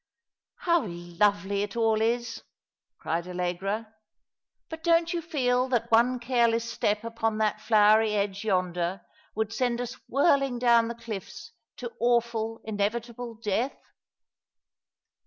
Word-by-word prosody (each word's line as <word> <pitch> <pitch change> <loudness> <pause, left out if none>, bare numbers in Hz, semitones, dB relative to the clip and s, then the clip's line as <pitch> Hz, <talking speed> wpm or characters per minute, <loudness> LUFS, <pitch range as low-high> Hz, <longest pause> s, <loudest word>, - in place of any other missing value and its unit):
" - - -66
How 340 -8 +3
lovely 195 +3 0
it 205 +1 -4
all 225 -2 +2
is! 235 +2 -1 0.3
" - - -65
cried 170 +2 -3
Allegra. 190 +5 -3 0.4
" - - -60
But 320 0 -8
don't 335 0 +3
you 340 - -1
feel 255 -6 +1
that 235 -2 0
one 245 +3 +4
careless 235 -2 +1
step 210 -2 -1
upon 225 -1 -2
that 215 -1 0
flowery 215 0 +4
edge 200 0 -1
yonder 180 -2 -1 0.3
would 220 0 -2
send 240 0 0
us 245 0 -4 0.2
whirling 275 -2 +3
down 235 -1 +4
the 235 - -5
cliffs 230 0 -8 0.3
to 240 -2 -6
awful, 235 -1 0
inevitable 230 +3 -3
death 220 +4 -2
225 Hz, 135 wpm, -27 LUFS, 205-240 Hz, 0.4 s, one